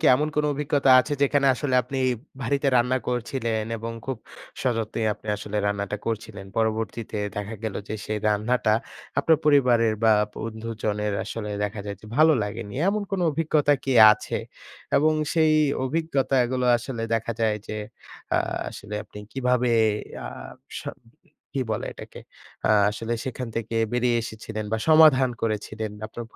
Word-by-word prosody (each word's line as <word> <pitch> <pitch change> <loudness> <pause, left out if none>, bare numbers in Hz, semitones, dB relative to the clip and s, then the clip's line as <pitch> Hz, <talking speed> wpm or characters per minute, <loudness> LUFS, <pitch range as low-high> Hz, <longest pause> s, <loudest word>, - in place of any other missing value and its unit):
কি - - +2
এমন 150 +4 0
কোন 150 - +2
অভিজ্ঞতা 140 -1 +1
আছে 145 - -5
যেখানে 140 0 +3
আসলে 130 -1 -2
আপনি 135 +2 -5 0.4
ভারিতে 140 +3 +1
রান্না 125 +2 +2
করছিলেন 115 -2 -1
এবং 115 +1 -5
খুব 130 -2 -2 0.5
সযত্নে 115 -3 -1
আপনি 105 - -14
আসলে 105 +1 -5
রান্নাটা 100 0 -1
করছিলেন? 110 -3 -4
পরবর্তীতে 110 0 -1 0.2
দেখা 105 +2 -4
গেল 110 - -2
যে, 110 - -3
সেই 110 0 -2
রান্নাটা 110 +1 +2 0.4
আপনার 160 +1 +4
পরিবারের 125 -6 +4
বা 110 - +6 0.2
বন্ধুজনের 110 -2 -3
আসলে 105 -2 -5
দেখা 105 0 -4
যায় 100 -1 -4
যে, 110 - -13
ভালো 155 +1 +6
লাগেনি, 105 0 -5
এমন 210 +1 0
কোন 195 -2 -1
অভিজ্ঞতা 150 -1 +2
কি 135 - 0 0.2
আছে? - - -3 0.6
এবং 155 +2 +4 0.2
সেই 160 -2 +4 0.3
অভিজ্ঞতাগুলো 130 -4 +1
আসলে 120 -1 -5
দেখা 115 +1 -1
যায় 110 -1 +2
যে, 110 - -5 0.6
আ - - +4 0.3
আসলে 105 +1 -8
আপনি 105 - -12
কিভাবে 125 -2 +1 0.6
আ - - -5 0.5
স - - -6 0.7
কি 135 - +1
বলে - - -3
এটাকে? - - -11 0.5
আ - - +5 0.2
আসলে 115 +2 -4
সেখান 125 -1 -4
থেকে 115 0 -3 0.2
বেরিয়ে 120 -1 +2
এসেছিলেন 110 -1 -6
বা 110 - +1
সমাধান 155 -5 +7
করেছিলেন, 110 0 -2
বা - - -13
আপনার 120 +1 -7
115 Hz, 150 wpm, -25 LUFS, 110-135 Hz, 0.7 s, সমাধান